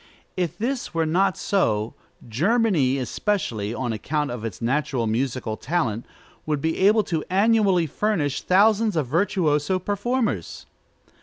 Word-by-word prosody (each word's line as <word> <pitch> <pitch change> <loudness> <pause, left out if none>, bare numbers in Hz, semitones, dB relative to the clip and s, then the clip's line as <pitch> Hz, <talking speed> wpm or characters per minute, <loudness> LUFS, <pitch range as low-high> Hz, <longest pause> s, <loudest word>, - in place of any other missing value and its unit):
If 175 -4 -2
this 245 -4 -3
were 165 -1 +1
not 185 +4 +1
so, 110 - 0 0.3
Germany 160 - +2
especially, 125 - -2
on 120 -1 -3
account 145 +6 -2
of 120 -2 -6
its 110 -5 -5
natural 130 0 -1
musical 115 -1 -2
talent, 125 -9 -2 0.4
would 150 -2 0
be 160 +3 -1
able 210 +3 +4 0.2
annually 195 -2 +3
to 150 - -11
furnish 170 -10 0
thousands 210 +2 +3
of 155 -4 +1
virtuoso 165 +1 +1
performers. 205 - -2
160 Hz, 130 wpm, -23 LUFS, 125-200 Hz, 0.4 s, able